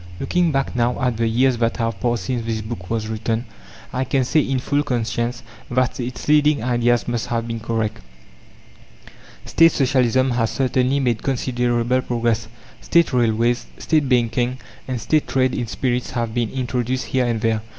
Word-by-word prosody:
Looking 175 -2 +1
back 135 -2 -1
now 120 0 +1
at 125 -4 0
the 115 0 +1
years 125 +2 +2
that 115 0 0
have 115 -4 -2
passed 120 -1 0
since 125 -3 -2
this 110 -1 -2
book 105 -5 -7
was 115 -1 -1
written, 110 +2 -2 0.5
I 130 - 0
can 130 0 +1
say 155 +5 +2
in 135 -2 0
full 145 +3 0
conscience 120 -2 -2 0.3
that 130 +1 0
its 125 0 -5
leading 150 -3 +4
ideas 120 -1 +1
must 120 -2 -2
have 115 -1 -2
been 115 -1 -4
correct. 110 - -2 1.5
State 165 0 +5
Socialism 130 -1 +2
has 115 -2 +1
certainly 130 +1 +1
made 120 -5 0
considerable 125 -1 0
progress. 115 -2 -1 0.3
State 170 -4 +2
railways, 120 0 +1
State 155 -4 +1
banking, 120 0 +1 0.3
and 130 -2 -2
State 155 +7 +1
trade 130 -1 +1
in 120 - -2
spirits 125 +1 -1
have 115 -2 -2
been 120 -2 0
introduced 125 0 -2
here 130 -2 0
and 115 -2 0
there. 115 -1 +1
120 Hz, 170 wpm, -21 LUFS, 115-130 Hz, 1.5 s, State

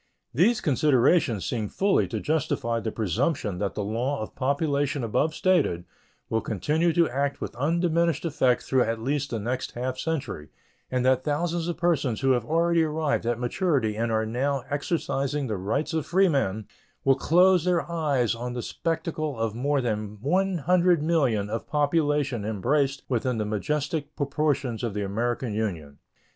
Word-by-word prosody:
These 210 - +3
considerations 130 - +2
seem 110 -4 -2
fully 195 0 +2
to - - -3
justify 130 -6 -1
the 110 -1 -3
presumption 110 - -1
that 100 -1 -2
the 105 - -2
law 120 +7 -1
of - - -8
population 140 0 0
above 150 +8 0
stated 150 - +1 0.4
will 110 0 0
continue 150 - 0
to 170 0 +4
act 140 +3 -1
with - - -6
undiminished 170 +3 +1
effect 130 -6 +2
through 130 -1 +2
at 115 -1 0
least 140 +4 -1
the 115 - -2
next 120 +4 -3
half 130 +1 -3
century, 145 - -3 0.4
and 125 -1 0
that 130 0 +3
thousands 165 +3 -1
of 175 - -3
persons 150 -10 0
who 135 - +3
have 120 -3 +2
already 165 +2 +2
arrived 155 -5 0
at 120 -1 +1
maturity 125 - 0
and 115 +1 -1
are 110 0 +1
now 130 +4 -1
exercising 145 -1 -1
the 110 -4 -2
rights 110 - -2
of 160 -2 0
freemen 140 - +2 0.4
will 135 - +5
close 180 +5 +4
their 180 -2 +1
eyes 145 -9 0
on 120 +1 -5
the 120 -1 -4
spectacle 155 -4 -3
of 115 -2 -1
more 140 +4 0
than 105 -3 -3
100,000,000 165 - +2
of 110 +2 -4
population 145 -5 +1
embraced 135 +7 0
within 125 -1 0
the 105 - -1
majestic 145 +7 -2
proportions 140 -4 -1
of 115 -4 -2
the 105 - -1
American 115 +3 -2
Union. 85 -10 -4
135 Hz, 160 wpm, -26 LUFS, 115-160 Hz, 0.4 s, will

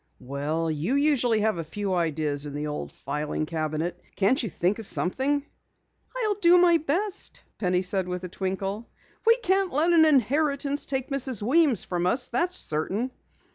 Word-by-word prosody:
"Well, 145 +5 -2
you 155 - -1
usually 260 -6 +2
have 215 -5 0
a - - -2
few 195 +4 -3
ideas 155 -4 0
in 145 - -7
the 150 +1 -3
old 150 0 -5
filing 150 +2 -3
cabinet. 155 +1 -3
Can't 230 +9 +2
you 225 - -2
think 180 +5 -1
of 220 - -3
something?" 275 +9 0 0.7
"I'll 435 -4 +1
do 360 -3 +5
my 350 -1 +5
best," 345 +7 -2 0.2
Penny 180 -2 +1
said 190 -1 0
with 180 0 -4
a - - -4
twinkle. 195 +4 -4 0.4
"We 460 +1 +7
can't 380 0 +2
let 325 +5 +2
an 320 -2 +6
inheritance 285 +1 +1
take 265 0 -2
Mrs. 260 -6 +2
Weems 270 - +3
from 175 -1 -2
us, 245 +6 0
that's 350 +9 +1
certain." 195 +11 -2
215 Hz, 170 wpm, -26 LUFS, -, 0.7 s, We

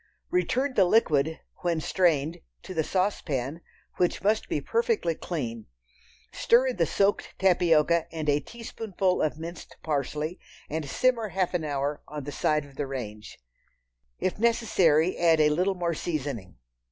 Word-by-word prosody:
Return 275 -6 +1
the 195 -6 +5
liquid, 160 -6 +2 0.2
when 170 -2 -1
strained, 160 -3 +1 0.2
to - - -7
the 160 -2 +1
saucepan, 160 -6 -1 0.4
which 180 - 0
must 215 +2 +1
be - - 0
perfectly 460 - 0
clean; 120 -11 -5 0.7
stir 240 +3 +4
in 250 - -4
the 165 -2 +2
soaked 200 +1 +1
tapioca 170 -3 +3
and 160 -2 -4
a 145 0 +3
teaspoonful 200 -2 -2
of 155 0 0
minced 165 +1 -8
parsley, 150 +3 -2 0.3
and 155 -2 -3
simmer 240 - +2
half 185 -1 -1
an 175 -3 0
hour 145 0 -2
on 150 -1 -6
the 145 - -6
side 150 +1 0
of 140 -1 -17
the 145 - -2
range. 110 -6 -7 0.8
If 185 - -2
necessary, 190 -8 +3
add 165 -2 +4
a 150 -1 +5
little 180 +6 +1
more 170 -2 -1
seasoning. 135 - -4
165 Hz, 150 wpm, -27 LUFS, 150-190 Hz, 0.8 s, the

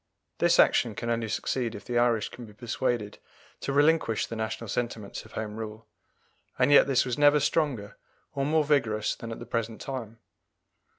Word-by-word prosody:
This - - +4
action 115 -3 +4
can 115 +3 -3
only 115 -1 -1
succeed 120 +1 -2
if 105 - -9
the 120 -1 0
Irish 120 -3 +2
can 120 -2 -10
be 105 - -14
persuaded 115 -1 -2 0.4
to - - -3
relinquish 145 -5 +3
the 115 - -7
national 110 +1 -4
sentiments 110 -2 -4
of 110 - -16
Home 110 -1 -5
Rule; 110 0 -7 0.7
and 130 +3 +3
yet 145 - +7
this 130 -2 +3
was 125 +2 -3
never 145 0 +6
stronger 140 -9 -1 0.4
or 140 - -1
more 155 +2 +2
vigorous 120 -8 +1
than 115 - -8
at 115 - -5
the 120 - -8
present 115 -1 -3
time. 120 -5 -6
115 Hz, 180 wpm, -28 LUFS, 110-135 Hz, 0.7 s, yet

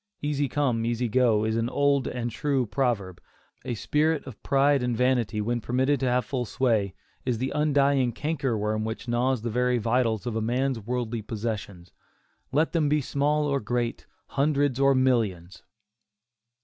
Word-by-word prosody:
"Easy 145 -2 0
come, 125 -5 0
easy 120 +1 0
go," 115 -2 +3
is 110 0 0
an 115 +1 0
old 140 -1 +2
and 120 -1 -3
true 135 +1 0
proverb. 105 -7 -1 0.4
A 120 - -3
spirit 150 +6 0
of 125 -6 -10
pride 140 0 +3
and 125 -2 -1
vanity, 125 -4 +1
when 120 +2 -1
permitted 130 +5 +1
to 130 - 0
have 125 0 +1
full 130 -3 -2
sway, 110 -5 0 0.3
is 125 -3 -1
the 130 +3 -2
undying 140 -4 +2
canker 140 -3 -2
worm 105 +1 -1
which 110 +3 -5
gnaws 120 0 0
the 115 - -2
very 125 +2 +1
vitals 115 -1 0
of 120 -2 -3
a 110 - 0
man's 125 +2 0
worldly 120 0 -3
possessions, 105 -5 -5 0.6
let 155 +4 +2
them 160 -4 +1
be 150 +1 +3
small 150 +2 0
or 140 -1 +1
great, 120 +1 -2 0.2
hundreds 140 -2 +1
or 135 0 +4
millions. 100 -9 0
125 Hz, 165 wpm, -26 LUFS, 115-140 Hz, 0.6 s, or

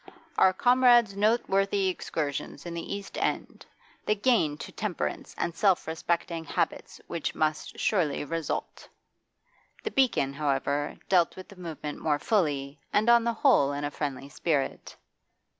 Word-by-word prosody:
'Our 190 - +6
comrade's 245 -1 +5
noteworthy 200 -2 +2
exertions 150 -5 -3
in 170 - -5
the 170 +3 -4
East 200 -1 -7
End.... - - -3 0.4
The 210 - +3
gain 205 - +2
to - - -8
temperance 205 -5 -4
and 170 - -1
self 195 -1 +3
respecting 165 +1 -2
habits 160 - -2
which 170 -2 -3
must 155 -1 -1
surely 160 -9 +1
result....' 165 0 -4 0.9
The 440 - -3
'Beacon,' 230 - +2
however, 145 0 -1
dealt 175 -3 +3
with 185 - -10
the 200 - -13
movement 160 -4 -6
more 150 -2 +1
fully, 145 -7 0
and 215 +3 +4
on 235 -1 +6
the 235 - +1
whole 220 - +4
in 145 +1 -3
a 145 - -2
friendly 140 -2 -4
spirit. 145 -1 -2
170 Hz, 140 wpm, -28 LUFS, 145-205 Hz, 0.9 s, Our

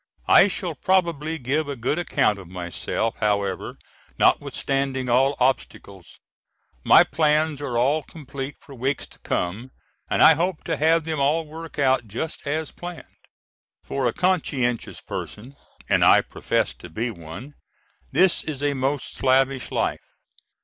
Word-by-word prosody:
I - - +7
shall 180 -3 -2
probably 165 -1 0
give 145 +3 -1
a 140 - -3
good 130 +7 -1
account 105 -11 +1
of 95 - -11
myself 90 +5 -3
however 100 -3 -1 0.4
notwithstanding 135 -2 +1
all 135 +4 +3
obstacles. 100 -7 -2 0.6
My - - +7
plans 150 0 +1
are 130 -5 -2
all 140 +6 +2
complete 140 -2 -8
for 140 - -14
weeks 135 +2 -2
to - - -18
come 100 +9 -3 0.4
and - - +3
I - - +9
hope 170 +2 -2
to 165 - -1
have 160 +2 +3
them 160 -1 -3
all 150 +4 +2
work 160 +1 -10
out 130 -4 +2
just 140 +8 -5
as 155 +1 -2
planned. 175 -1 -8 0.8
For 135 -2 -1
a - - +1
conscientious 140 -10 -1
person, 125 +7 -7 0.3
and - - +3
I - - +7
profess - - -1
to 90 - -11
be 115 +9 -3
one, 85 - -10 0.6
this 185 -1 +3
is 145 -3 -5
a 145 0 +1
most 135 +1 -2
slavish 135 0 +2
life. - - -3
140 Hz, 145 wpm, -23 LUFS, 120-155 Hz, 0.8 s, I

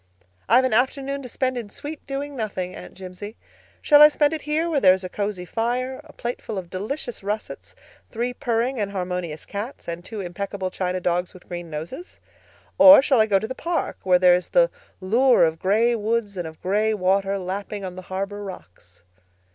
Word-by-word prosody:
"I've 245 +4 +6
an 255 - 0
afternoon 275 +3 0
to 250 - -8
spend 255 0 -1
in 220 -4 -8
sweet 295 +8 -8
doing 280 +1 -4
nothing, 195 -6 -4
Aunt - - -11
Jimsie. 190 +3 -9 0.5
Shall 295 -1 +7
I 300 - +11
spend 295 0 +2
it 315 - -3
here 305 +3 0
where 315 -4 +1
there 185 -6 +6
is 190 - -8
a 185 - -5
cosy 200 -2 -3
fire, 250 +6 -2
a 305 - -15
plateful 235 -4 -5
of 180 -2 -6
delicious 235 +6 -5
russets, 210 +2 -5 0.3
three 240 +2 -2
purring 240 +1 -1
and 200 -1 -2
harmonious 180 -4 -4
cats, 210 +7 -6
and 170 +1 -5
two 220 +3 -7
impeccable 190 +1 -4
china 185 0 -2
dogs 180 +1 -1
with 180 - -15
green 175 -1 -6
noses? 165 - -7 0.6
Or 285 -1 +10
shall 265 -5 +4
I 220 - +3
go 200 -2 +4
to 220 - -3
the 260 - -4
park, 335 +5 -3
where 185 -1 +4
there 180 0 +6
is 180 0 0
the - - +4 0.3
lure 235 +4 +4
of 160 0 -2
gray 220 +5 +2
woods 220 -1 -1
and 175 -3 -4
of 160 0 -11
gray 215 +3 +1
water 195 +1 +1
lapping 195 +2 -5
on 180 -1 -6
the 185 - -7
harbor 195 +2 -4
rocks?" 90 - -12
205 Hz, 195 wpm, -23 LUFS, 185-255 Hz, 0.6 s, I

